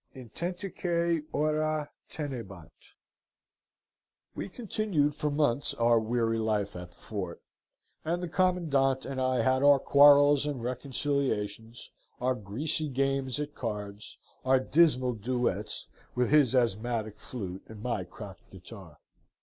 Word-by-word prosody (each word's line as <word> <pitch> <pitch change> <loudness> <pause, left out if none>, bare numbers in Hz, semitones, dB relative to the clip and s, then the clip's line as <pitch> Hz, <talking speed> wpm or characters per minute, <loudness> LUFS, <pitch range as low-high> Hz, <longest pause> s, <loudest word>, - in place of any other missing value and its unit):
Intentique 170 - -2
Ora 155 0 0 0.2
tenebant 115 - -7 1.6
"We 100 - -5
continued 200 - 0
for 150 0 -2
months 145 -2 +1
our 115 0 +4
weary 115 0 0
life 105 -3 -1
at 90 0 -7
the - - -24
fort, 95 -5 -6 0.6
and 175 +3 -1
the - - -2
commandant 155 -8 +1
and 135 -1 -3
I 130 -2 +1
had 130 +2 +2
our 145 0 +7
quarrels 145 +1 +6
and 135 -5 -3
reconciliations, 125 -4 -2 0.3
our 130 +1 +1
greasy 135 +8 -2
games 135 -1 0
at 150 0 -4
cards, 105 -4 -6 0.3
our 130 0 +4
dismal 130 -3 +3
duets 110 -2 -2 0.3
with 125 +1 +1
his 145 -4 +5
asthmatic 115 -2 0
flute 95 -6 -6
and 110 -1 -11
my 120 -6 -1
cracked 95 +2 -11
guitar. 95 -4 -12
130 Hz, 120 wpm, -29 LUFS, 110-145 Hz, 1.6 s, our